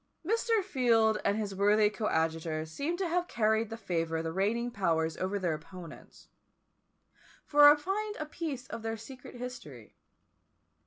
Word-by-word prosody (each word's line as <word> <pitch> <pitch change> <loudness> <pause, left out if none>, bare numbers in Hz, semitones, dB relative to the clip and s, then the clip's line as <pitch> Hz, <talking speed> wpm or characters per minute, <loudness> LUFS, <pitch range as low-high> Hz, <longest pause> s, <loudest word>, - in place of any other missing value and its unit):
Mr. 450 +1 +1
Field 235 - +2
and 200 - +1
his 210 -3 -3
worthy 205 +2 +4
coadjutor 160 -6 -1
seem 280 - -3
to 380 -1 -1
have 350 +1 0
carried 220 - +1
the 225 - -6
favour 165 -6 -2
of 160 - -2
the 165 - -3
reigning 230 +6 0
powers 165 -7 0
over 190 +2 -1
their 180 -4 0
opponents; 170 +1 -11 1.2
for 290 0 +8
I - - +5
find 410 +7 -3
a 305 - -4
piece 300 -5 -5
of - - -6
their 225 0 -3
secret 250 +3 -11
history. 240 - -9
220 Hz, 155 wpm, -30 LUFS, 180-285 Hz, 1.2 s, for